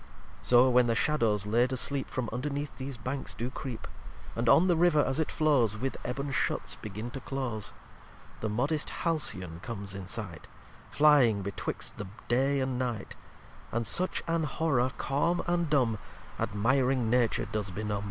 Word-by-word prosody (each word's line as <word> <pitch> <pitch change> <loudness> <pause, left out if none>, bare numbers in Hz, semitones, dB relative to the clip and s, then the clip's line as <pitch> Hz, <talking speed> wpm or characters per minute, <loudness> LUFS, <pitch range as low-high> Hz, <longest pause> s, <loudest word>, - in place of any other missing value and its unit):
lxxxiv - - -15
So 125 +1 +7
when 125 0 +5
the 115 - +2
Shadows 115 -8 +2
laid 120 +4 +2
asleep 135 +1 -1
From 130 -3 -2
underneath 140 +3 -3
these 130 -1 -5
Banks 130 +4 -4
do 120 +2 -3
creep, 125 -3 -6 0.5
And 115 0 +1
on 165 - +7
the 175 - +4
River 165 -3 +4
as 135 +3 0
it 160 - 0
flows 130 -9 +2
With 130 +4 -2
Eben 140 +3 -3
Shuts - - -1
begin 110 +3 -6
to 135 - -5
close; 125 -5 -4 0.7
The 110 - -2
modest 140 +8 0
Halcyon 95 - -1
comes 100 -4 -6
in 95 -2 -7
sight, 95 -7 -2 0.4
Flying 135 -9 +5
betwixt 100 0 -4
the 105 - -4 0.2
Day 135 +3 +2
and 130 -1 -1
Night; 120 -5 -3 0.6
And 120 0 -1
such 185 +9 +1
an 165 -1 +1
horror 140 -4 +1
calm 165 +6 0
and 175 -2 0
dumb, 125 -7 +2 0.4
Admiring 125 +2 +1
Nature 120 -2 +2
does 105 -2 -3
benum. 105 +2 -3
125 Hz, 160 wpm, -30 LUFS, 110-140 Hz, 0.7 s, So